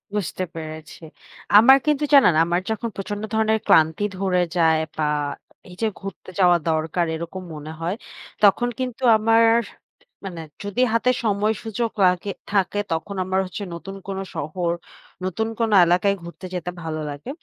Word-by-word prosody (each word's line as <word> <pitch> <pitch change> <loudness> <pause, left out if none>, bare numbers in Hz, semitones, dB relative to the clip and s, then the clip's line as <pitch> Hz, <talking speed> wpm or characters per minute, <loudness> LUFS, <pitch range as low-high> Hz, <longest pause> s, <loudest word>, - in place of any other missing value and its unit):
বুঝতে 185 -2 -2
পেরেছি। 155 0 -8 0.6
আমার 265 +5 +8
কিন্তু 300 -1 +1
জানেন 270 -11 +7
আমার 175 +2 0
যখন 220 +1 -2
প্রচন্ড 205 +2 -5
ধরনের 220 0 +2
ক্লান্তি 160 +5 +4 0.2
ধরে 185 -2 +1 0.2
যায়। 160 -2 +4 0.2
বা 155 - 0 0.7
এই 180 - -11
যে, 225 - +2
ঘুরতে 195 -2 -9
যাওয়া 175 -2 +5
দরকার 160 +2 0
এরকম 170 +3 -6
মনে 150 +1 -8
হয়। 170 +4 -2 0.5
তখন 210 +4 +5
কিন্তু 255 0 -4
আমার 225 +1 +4 0.8
মানে 175 -4 -6 0.2
যদি 205 +5 -2
হাতে 230 +2 +3
সময় 210 0 +1
সুযোগ 225 +1 -2
লাগে 180 +2 +1 0.2
থাকে 200 0 +1
তখন 165 +5 -3
আমার 190 +1 0
হচ্ছে 185 +3 -6
নতুন 195 +3 -8
কোনো 195 0 -3
শহর, 170 +3 -2 0.5
নতুন 190 +4 -1
কোনো 225 -2 +1
এলাকায় 180 +3 +2
ঘুরতে 170 +2 -10
যেতে 180 -1 -3
ভালো 155 -1 -4
লাগে। 145 - -8
190 Hz, 150 wpm, -22 LUFS, 170-220 Hz, 0.8 s, আমার